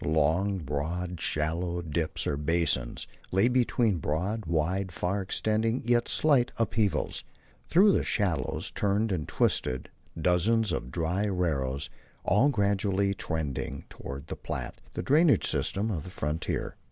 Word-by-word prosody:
Long, 80 +6 +2
broad, 85 +3 -3
shallow 85 +3 -1
dips 80 0 -2
or 70 - 0
basins 75 -4 0 0.3
lay 95 +5 +4
between 120 -5 +2
broad, 90 +8 -2
wide, 90 +4 0
far 90 +5 -1
extending, 110 +4 0
yet 120 0 +2
slight, 140 -6 +3
upheavals. 105 -6 0 0.5
Through 200 +4 +6
the - - +2
shallows 80 -11 -1
turned 105 +2 +1
and 80 -5 -2
twisted 65 0 0 0.3
dozens 95 +6 +2
of 60 - -3
dry 90 +6 0
arroyos, 70 -8 -1 0.3
all 105 +10 +4
gradually 100 -4 +1
trending 75 -6 -3
toward 70 +1 -7
the - - -5
Platte, - - -6
the - - -2
drainage 150 +2 +4
system 105 +3 0
of 80 -7 -3
the 90 - -8
frontier. 75 -2 -3
90 Hz, 130 wpm, -29 LUFS, 80-105 Hz, 0.5 s, Through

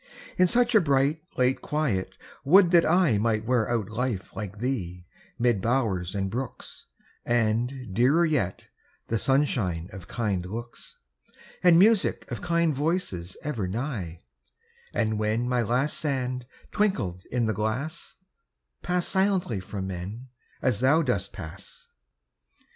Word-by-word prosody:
In 185 - +4
such 240 +3 +2
a 215 - +6
bright, 140 0 +2 0.2
late 125 +1 +2
quiet, 140 -12 -1 0.3
would 175 +5 +6
that 170 -2 +5
I 165 - +4
Might 110 0 0
wear 120 -2 +1
out 110 -3 -1
life 110 -4 -3
like 105 -2 -6
thee, 95 -8 -3 0.3
mid 120 -5 +2
bowers 110 -7 0
and 95 -1 -1
brooks, 125 +2 -6 0.4
And, 120 0 0
dearer 140 - +4
yet, 135 - -1 0.4
the 115 - 0
sunshine 110 - +1
of 95 -3 -9
kind 105 -6 -1
looks, 115 +6 -8 0.7
And 175 -2 +6
music 210 +2 +4
of - - -4
kind 170 -2 +1
voices 140 - -2
ever 115 -11 -2
nigh; 100 - -4 0.7
And 110 -1 0
when 110 +3 0
my 125 -1 +1
last 125 +6 0
sand 130 -4 -2 0.2
twinkled 105 - 0
in 120 -2 +1
the 110 - 0
glass, 115 - -3 0.7
Pass 180 0 0
silently 190 - +1
from 95 +1 -5
men, 95 +7 -6 0.3
as 125 -6 +2
thou 140 +6 +4
dost 125 -4 -1
pass. 485 0 -9
125 Hz, 135 wpm, -26 LUFS, 105-150 Hz, 0.7 s, a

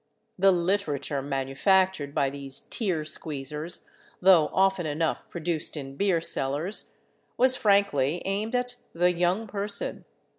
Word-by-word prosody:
The 195 +1 +6
"literature" 170 -7 0
manufactured 145 +4 +1
by 135 -1 +1
these 140 -1 -8
tear 180 -9 -1
squeezers, 150 +1 -5 0.3
though 180 -5 +5
often 190 -3 +2
enough 155 +2 -2
produced 165 -2 -3
in 135 -1 -7
beer 190 0 +2
cellars, 160 +5 -1 0.4
was 255 +1 +6
frankly 200 - +2
aimed 210 +5 -1
at 245 0 -1 0.2
the 180 +1 +3
Young 180 +5 +1
Person. 200 0 -3
175 Hz, 120 wpm, -27 LUFS, 145-195 Hz, 0.4 s, The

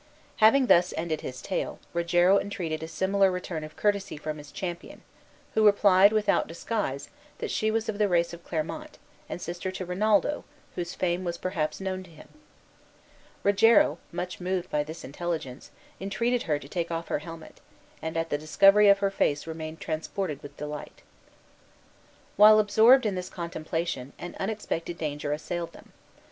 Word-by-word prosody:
Having 240 +5 +6
thus 180 -6 +4
ended 160 -1 -2
his 130 -1 -7
tale, 190 - -3 0.2
Rogero 175 +3 +4
entreated 170 -6 -4
a 160 - -5
similar 195 +3 +2
return 180 -3 -4
of 155 0 -9
courtesy 200 -5 0
from 155 0 -5
his 145 0 -12
companion, 180 -3 -6 0.5
who 220 - +3
replied, 200 -1 +6
without 215 -1 +2
disguise, 165 -5 -3 0.3
that - - -4
she 215 - +1
was 225 0 -1
of 215 -1 -3
the 210 - +4
race 170 -2 +1
of 170 0 -10
Clermont, 180 - -4 0.3
and - - -5
sister 175 +2 -4
to 185 0 -5
Rinaldo, 210 +10 +1 0.3
whose 175 -1 -4
fame 180 0 -1
was 170 -1 -3
perhaps 155 -5 -2
known 190 -1 -3
to 185 - -14
him. 160 - -15 1.1
Rogero, 200 -5 +5
much 180 +1 -5
moved 185 0 -2
by 150 0 +1
this 160 +3 -9
intelligence, 150 -3 -5 0.3
entreated 230 +5 0
her 150 - +3
to 140 - -11
take 170 +2 -3
off 165 0 -4
her - - 0
helmet, 165 -2 -11 0.4
and 160 +1 -4
at 165 0 -2
the 145 - 0
discovery 195 +7 +5
of 200 - +7
her 195 - +1
face 145 -6 0
remained 160 0 -6
transported 160 0 -3
with 145 0 -11
delight. 150 0 -7 1.3
While 215 +1 +9
absorbed 220 +5 +6
in 210 - +1
this 180 0 -4
contemplation, 165 -5 -4
an 175 - -8
unexpected 190 -5 -3
danger 145 -2 -3
assailed 170 +3 -4
them. - - -16
175 Hz, 165 wpm, -27 LUFS, 160-200 Hz, 1.3 s, While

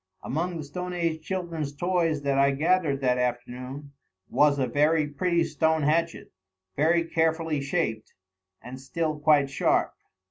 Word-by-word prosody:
Among 170 +5 -2
the 155 - -5
stone 180 +5 -6
age 165 -2 -1
children's 165 -6 -4
toys 165 -2 0
that 140 -1 +1
I 140 0 +5
gathered 155 -2 +1
that 125 -1 +1
afternoon 125 +3 -4 0.4
was 145 -1 +4
a 135 - +1
very 150 +5 +2
pretty 170 +4 0
stone 160 0 +1
hatchet, 165 +3 0 0.4
very 165 +3 +3
carefully 160 -2 0
shaped, 140 -7 -2 0.5
and 130 +1 -9
still 155 +2 -2
quite 145 -2 +3
sharp. - - +1
155 Hz, 140 wpm, -26 LUFS, 140-165 Hz, 0.5 s, I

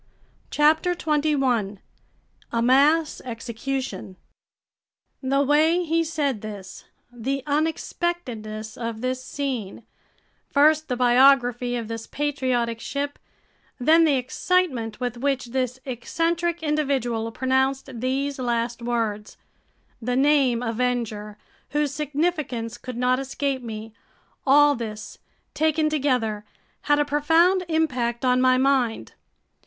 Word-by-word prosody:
CHAPTER 315 +4 +3
21 275 - 0 0.7
A 230 - 0
Mass 290 +5 +3
Execution 235 -3 -5 1.1
THE 275 +1 +1
WAY 315 +5 +3
HE 330 +1 +1
SAID 295 -8 -1
THIS, 200 -3 -9 0.3
the 265 +3 -3
unexpectedness 285 -8 -3
of 230 -2 -4
this 255 0 -2
scene, 255 -7 -4 0.7
first 310 +2 +4
the 250 - -1
biography 245 -1 +4
of 230 -2 -4
this 225 0 -6
patriotic 255 -5 -1
ship, 285 +3 -4 0.6
then 320 +6 +5
the 305 -3 +4
excitement 255 - 0
with 245 -2 -3
which 260 -2 -1
this 255 -1 -1
eccentric 330 +7 -1
individual 265 -7 0
pronounced 265 +2 0
these 270 +2 -1
last 235 -1 -1
words—the 230 +1 -5
name 265 -3 +3
Avenger 225 -3 -2 0.3
whose 295 -1 0
significance 290 -6 -2
could 255 -2 -7
not 250 +1 +2
escape 270 0 -2
me—all 235 +6 0
this, 220 -4 -7 0.3
taken 310 0 +1
together, 250 -8 0 0.5
had 290 - +5
a 295 - +2
profound 325 +6 +3
impact 255 -7 0
on 250 0 +3
my 255 0 +4
mind. 260 -4 +1
260 Hz, 105 wpm, -24 LUFS, 235-295 Hz, 1.1 s, then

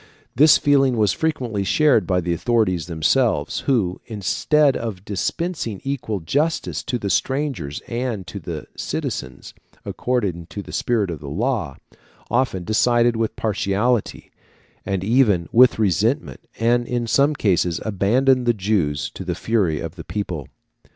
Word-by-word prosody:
This 150 +3 +7
feeling 135 -3 +3
was 105 -4 +3
frequently 125 -10 -2
shared 130 - +3
by 90 -1 +1
the 85 0 -1
authorities 90 -2 0
themselves, 85 - +1
who, 100 -9 +1
instead 135 - +2
of 105 -5 -5
dispensing 115 - -3
equal 125 -8 -3
justice 145 - -1
to 130 -2 -1
the 100 -4 -3
strangers 130 - -1
and 120 -5 -3
to 100 +4 -7
the 80 -3 -6
citizens, - - -5 0.3
according 100 -10 -2
to 100 - -7
the - - -11
spirit 110 -6 0
of 80 - -6
the 70 -1 -8
law, 100 - -1 0.6
often 120 -7 0
decided 120 +4 +2
with 110 -1 -1
partiality, 105 +2 -1 0.6
and 95 -1 -1
even 105 -6 +3
with 125 +2 +6
resentment, 105 - 0
and 120 +1 +2
in 120 -1 -1
some 140 +5 +2
cases 90 -7 +1
abandoned 120 +5 +2
the 120 - +3
Jews 95 -8 -1
to - - -8
the 90 -1 -3
fury 95 -7 0
of 85 +1 -7
the - - -7
people. 90 -9 -4
110 Hz, 145 wpm, -21 LUFS, 90-125 Hz, 0.6 s, This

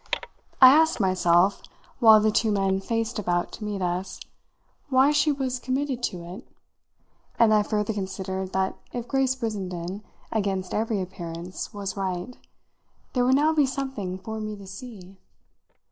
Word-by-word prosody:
I 260 0 +10
asked 320 -1 +4
myself, 185 -1 +3 0.4
while 220 -3 +8
the 215 0 +2
two 220 0 +2
men 195 -1 +1
faced 225 +2 -2
about 175 -3 -1
to 220 - -8
meet 205 -2 -3
us, 180 +1 -3 0.7
why 265 +2 +5
she 300 +1 +3
was 260 -3 -2
committed 260 0 -2
to 180 -7 -3
it, 180 +8 -10 0.9
and 225 -2 +5
I 210 - +5
further 210 +1 -1
considered 190 -1 -4
that 190 0 -1
if 245 -1 -4
Grace 265 -1 +1
Brissenden, 195 -5 -4 0.3
against 195 -4 -1
every 220 -1 0
appearance, 175 -1 -6
was 200 -2 -5
right, 190 +4 -3 0.8
there 250 - +2
would 260 +1 +4
now 305 +3 +3
be 295 -3 +3
something 265 -9 -4
for 220 +4 -6
me 215 0 -4
to 200 -1 -12
see. 195 -2 -10
210 Hz, 150 wpm, -25 LUFS, 190-250 Hz, 0.9 s, I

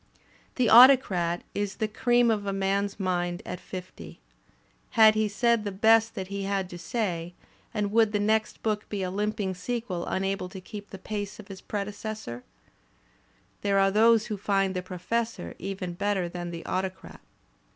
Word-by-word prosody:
"The 250 -2 +2
Autocrat" 220 -9 +6
is 205 -1 -2
the 220 - -1
cream 240 +2 +3
of 205 -2 -1
a - - 0
man's 195 +1 -1
mind 175 -2 -1
at 180 - -5
fifty. 180 - -9 0.8
Had 220 -1 +8
he 215 0 +1
said 235 +2 +1
the 205 - -3
best 225 +3 +4
that 190 -3 -5
he 200 0 -4
had 195 -2 -2
to 175 - -8
say, 175 -5 -3 0.4
and 210 -3 -2
would 220 -1 +4
the 210 - 0
next 215 +1 0
book 210 -1 -1
be 200 -2 -3
a 180 - -2
limping 205 -1 -1
sequel 200 -2 -4
imable 195 -1 -2
to 190 - -8
keep 205 +2 -9
the 195 - -8
pace 205 +1 -5
of 205 -1 -10
its 190 - -9
pre 205 -1 -3
decessor? 210 - -6 1.2
There 200 -1 +1
are 195 0 +4
those 220 +1 +5
who 215 -3 -4
find 195 -1 0
"The 180 - -1
Professor" 185 - -3
even 185 -1 -4
better 195 0 -1
than 175 0 -6
"The 170 -1 -7
Autocrat." 185 0 -4
200 Hz, 170 wpm, -27 LUFS, 185-215 Hz, 1.2 s, Had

